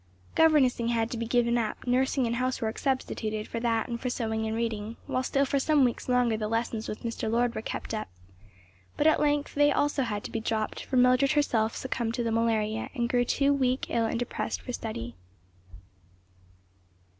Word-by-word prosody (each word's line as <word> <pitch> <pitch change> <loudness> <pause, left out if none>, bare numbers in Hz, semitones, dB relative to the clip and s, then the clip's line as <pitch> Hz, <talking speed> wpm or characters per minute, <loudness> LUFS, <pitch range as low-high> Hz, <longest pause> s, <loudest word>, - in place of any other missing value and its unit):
Governessing 275 -7 +4
had 230 -1 0
to 235 - -3
be 230 - -2
given 240 0 +2
up, 220 - -3
nursing 260 +1 +2
and 235 0 -1
housework 250 -3 -1
substituted 220 -5 -2
for 230 - -4
that 230 -1 0
and 235 -1 -4
for 255 - -1
sewing 220 -2 -2
and 220 - -2
reading, 225 -1 -3
while 255 - -1
still 275 +2 +1
for 275 +1 0
some 295 0 +3
weeks 245 0 -1
longer 250 -2 +3
the 215 -1 -2
lessons 225 0 -2
with 215 - -6
Mr. 230 -1 -3
Lord 235 +1 +1
were - - -4
kept 225 - -5
up; 215 - -3 0.9
but 290 - +1
at 315 - +5
length 290 -1 +1
they 290 0 +4
also 290 -1 +1
had 210 -5 -2
to - - -7
be 225 - -2
dropped, 220 -1 -2
for 260 - -1
Mildred 255 +3 +4
herself 230 -7 +1
succumbed 235 -3 -2
to 240 - -1
the 230 - -1
malaria 225 -1 0
and 240 -2 0
grew 245 0 +3
too 280 +3 +2
weak, 260 -2 +1
ill 230 -1 +2
and - - -2
depressed 245 0 -3
for 250 - -5
study. 120 - -5
235 Hz, 195 wpm, -28 LUFS, 225-260 Hz, 0.9 s, at